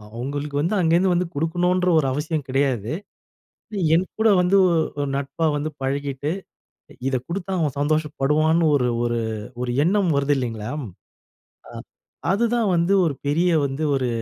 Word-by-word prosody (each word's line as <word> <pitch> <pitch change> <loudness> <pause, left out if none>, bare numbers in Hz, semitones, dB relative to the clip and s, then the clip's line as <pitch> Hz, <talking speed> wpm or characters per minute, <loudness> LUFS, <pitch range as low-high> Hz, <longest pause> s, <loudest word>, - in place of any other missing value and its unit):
அவங்களுக்கு 140 +4 -4
வந்து 170 +8 0
அங்கேருந்து 175 +2 +3
வந்து 175 0 0
குடுக்கணுன்ற 180 +4 +1
ஒரு 140 - 0
அவசியம் 150 0 -2
கிடையாது. 130 -4 0 1.0
என்கூட 190 +6 0
வந்து 180 +2 +2 0.4
ஒரு 145 - -1
நட்பா 140 +4 -2
வந்து 145 +2 -2
பழகிட்டு 140 +2 -2 0.8
இத 130 - 0
குடுத்தா 190 +2 -4
அவன் 150 -5 -1
சந்தோஷப்படுவான்னு 155 +2 +1
ஒரு 125 -3 +2 0.2
ஒரு 120 0 0 0.4
ஒரு 125 - -2
எண்ணம் 190 0 +2
வருது 140 +1 +2
இல்லைங்களாம்? 125 +3 -4 0.8
அ - - -12 0.6
அதுதான் 230 +1 +1
வந்து 170 +3 +2
ஒரு 155 - 0
பெரிய 165 +5 +2 0.2
வந்து 135 +3 -4
ஒரு 130 -2 0
150 Hz, 130 wpm, -22 LUFS, 140-175 Hz, 1.0 s, அங்கேருந்து